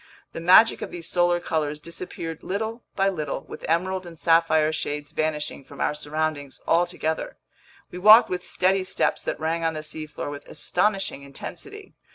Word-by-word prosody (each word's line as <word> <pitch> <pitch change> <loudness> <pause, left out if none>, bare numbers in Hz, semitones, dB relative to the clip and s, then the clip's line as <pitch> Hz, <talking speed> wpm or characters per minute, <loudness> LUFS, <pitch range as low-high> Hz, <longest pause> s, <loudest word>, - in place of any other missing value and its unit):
The - - -5
magic 185 +6 +6
of - - -4
these 170 -2 -6
solar 175 0 +2
colors 150 -3 -2
disappeared 165 0 -7
little 220 +4 -3
by 195 0 +2
little, 155 -8 -2
with - - -11
emerald 185 +2 0
and 165 -1 -11
sapphire 160 -1 +3
shades 145 -1 -3
vanishing 150 -2 -2
from 140 +1 -14
our - - +1
surroundings 150 -1 -3
altogether. 165 -2 0 0.5
We 180 - -7
walked 215 +4 +9
with 180 0 -3
steady 190 +1 +1
steps 185 - 0
that - - -3
rang 165 +1 -1
on 165 -1 0
the 155 - -5
seafloor 155 -1 -6
with 145 0 -9
astonishing 195 -6 0
intensity. 405 - -8
165 Hz, 165 wpm, -25 LUFS, 155-185 Hz, 0.5 s, walked